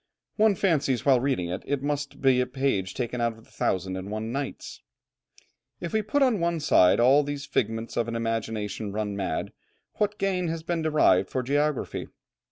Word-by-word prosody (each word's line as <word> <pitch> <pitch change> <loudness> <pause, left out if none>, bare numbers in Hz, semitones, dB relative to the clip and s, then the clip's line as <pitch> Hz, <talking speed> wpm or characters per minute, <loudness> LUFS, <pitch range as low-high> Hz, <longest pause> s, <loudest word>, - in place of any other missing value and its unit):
One 215 -2 +4
fancies 150 - +1
while 135 -3 +5
reading 125 -10 -1
it 90 +2 -3
that - - -17
it 140 -1 -1
must 145 0 -3
be 130 -2 +4
a 125 - -1
page 125 -8 -1
taken 125 -1 -3
out 115 -1 0
of 115 - -18
the - - -25
Thousand 95 0 -1
and 95 +1 -6
one 110 +2 -4
Nights. 140 +2 -5 1.0
If 170 - -5
we 220 - +2
put 275 +7 +1
on 245 -6 +2
one 170 -1 0
side 90 -11 +4
all 130 +5 +6
these 145 -1 -4
figments 115 +1 -2
of 120 - +1
an 115 - -3
imagination 110 -2 -3
run 105 0 -3
mad, 95 -5 -3 0.4
what 210 0 0
gain 185 -2 0
has 165 0 -3
been 170 0 -1
derived 150 -12 +3
for 130 - -2
geography? 145 +1 -1
130 Hz, 190 wpm, -26 LUFS, 110-155 Hz, 1.0 s, all